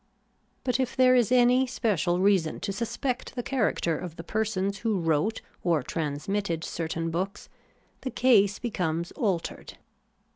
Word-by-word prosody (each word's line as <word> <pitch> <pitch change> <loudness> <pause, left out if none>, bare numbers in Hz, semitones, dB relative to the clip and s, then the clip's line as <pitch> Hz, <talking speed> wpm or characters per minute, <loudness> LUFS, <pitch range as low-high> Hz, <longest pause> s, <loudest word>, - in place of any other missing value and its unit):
But 250 0 0
if 260 -2 -1
there 255 -1 +5
is 245 -2 +3
any 250 +1 +5
special 190 -8 0
reason 190 -5 +2
to 195 - -2
suspect 235 +5 -3
the 245 - -3
character 215 - 0
of 175 -3 -7
the 165 - -8
persons 200 -1 -1
who 220 -1 0
wrote 165 +6 0 0.2
or 165 -6 +2
transmitted 165 +4 -2
cer 165 -1 -3
tain 165 0 -2
books, 190 +4 -3 0.5
the 260 - -3
case 210 -7 +4
becomes 170 -7 -2
altered. 195 - -3
200 Hz, 145 wpm, -27 LUFS, 170-240 Hz, 0.5 s, there